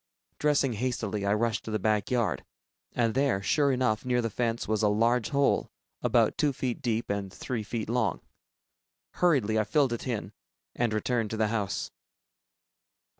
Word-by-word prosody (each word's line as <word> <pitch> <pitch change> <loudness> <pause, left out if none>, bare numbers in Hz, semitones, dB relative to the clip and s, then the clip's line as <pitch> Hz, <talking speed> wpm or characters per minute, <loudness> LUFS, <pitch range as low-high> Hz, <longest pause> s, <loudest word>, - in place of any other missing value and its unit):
Dressing 145 -4 +2
hastily, 110 -3 -2
I 100 - +3
rushed 115 0 0
to - - -5
the 110 - 0
back 105 -1 0
yard, 120 -2 0 0.5
and 115 -2 +1
there, 135 -6 +2
sure 145 +5 +3
enough, 125 -4 +1
near 125 -1 +1
the 115 -2 -1
fence, 115 +1 -1
was 110 0 0
a 105 - +4
large 115 +3 +2
hole 140 -1 +2 0.3
about - - +2
two 145 -2 +2
feet 125 -2 -3
deep 115 -2 -1
and 100 -1 -3
three 120 +3 -4
feet 110 +1 -4
long. 115 -1 0 1.0
Hurriedly, 125 -11 +3
I - - +3
filled 130 +4 +2
it 120 - -5
in 115 -5 -3 0.4
and 120 -2 0
returned 110 +1 0
to 110 - -4
the 110 -1 +1
house. 105 -3 -2
115 Hz, 170 wpm, -28 LUFS, 110-125 Hz, 1.0 s, a